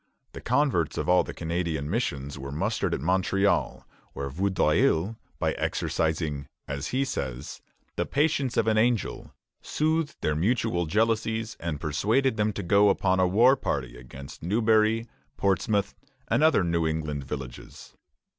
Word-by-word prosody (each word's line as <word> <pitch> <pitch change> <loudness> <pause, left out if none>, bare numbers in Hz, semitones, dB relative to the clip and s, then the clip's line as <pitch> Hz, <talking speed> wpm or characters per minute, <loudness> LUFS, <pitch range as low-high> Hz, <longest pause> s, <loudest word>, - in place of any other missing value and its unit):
The - - -9
converts 125 - +1
of - - -2
all 90 0 +5
the - - -7
Canadian 85 -3 -2
missions 70 - -2
were 70 +1 -6
mustered 75 - -1
at - - -6
Montreal, 95 +4 +1 0.3
where 70 0 -4
Vaudreuil, 90 +2 +1 0.2
by - - 0
exercising, 80 -3 -2 0.2
as 70 +2 -4
he 135 +2 0
says, 65 - -5 0.4
"the - - -1
patience 140 -3 0
of - - +3
an 110 -1 +3
angel," 120 -2 0 0.3
soothed 155 0 0
their 75 - 0
mutual 95 -1 0
jealousies 110 +3 0
and 80 -4 -3
persuaded 110 - +1
them 105 0 +1
to 100 - -5
go 100 +3 +4
upon 95 -1 +2
a 90 - +4
war 120 +8 +5
party 65 - -3
against 65 +3 -11
Newbury, 110 +3 +2 0.3
Portsmouth, 100 +1 +1 0.3
and - - +1
other 155 - +4
New 85 -1 +1
England 75 -3 -2
villages. 65 -3 -8
95 Hz, 145 wpm, -27 LUFS, 75-115 Hz, 0.4 s, all